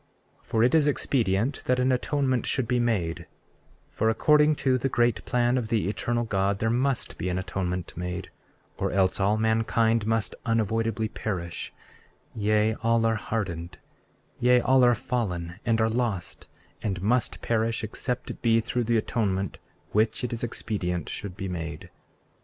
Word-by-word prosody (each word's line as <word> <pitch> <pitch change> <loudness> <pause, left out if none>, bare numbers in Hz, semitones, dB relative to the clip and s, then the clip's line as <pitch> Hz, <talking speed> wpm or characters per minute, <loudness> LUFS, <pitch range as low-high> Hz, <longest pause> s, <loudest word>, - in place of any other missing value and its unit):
34:9 - - -31
For 110 0 +2
it 125 - +3
is 155 -2 +4
expedient 125 -3 0
that 125 - +2
an 130 +1 +3
atonement 130 0 0
should 130 -4 +1
be 125 +1 +1
made; 85 -8 -1 0.6
for 110 - +1
according 150 +6 +4
to 130 -3 +1
the 135 - 0
great 120 -1 +1
plan 125 0 +2
of 115 - -4
the 110 -4 0
Eternal 120 +3 -1
God 100 -2 0
there 110 +2 0
must 130 +2 -1
be 90 - -1
an 90 - -1
atonement 90 -1 -3
made, 90 +1 -5 0.5
or - - 0
else 95 0 +2
all 100 +2 +2
mankind 110 0 +2
must 110 -1 0
unavoidably 115 -1 0
perish; 90 -6 -4 0.6
yea, 110 +1 +2
all 115 0 +2
are 115 - +3
hardened; 95 -6 -3 0.6
yea, 125 0 +5
all 130 0 +4
are 120 -1 +5
fallen 90 -10 -3
and 115 -1 +3
are 110 - +3
lost, 110 -6 -2 0.3
and 95 -4 -3
must 120 +3 +1
perish 115 0 0
except 125 +3 -3
it - - -10
be 115 -1 +4
through 120 +1 -1
the 115 0 +2
atonement 100 -4 -1 0.3
which 110 +3 +1
it 125 - -2
is 115 - -4
expedient 95 -7 -3
should 100 -3 -6
be 95 - -4
made. 85 -3 -6
110 Hz, 165 wpm, -26 LUFS, 95-120 Hz, 0.6 s, yea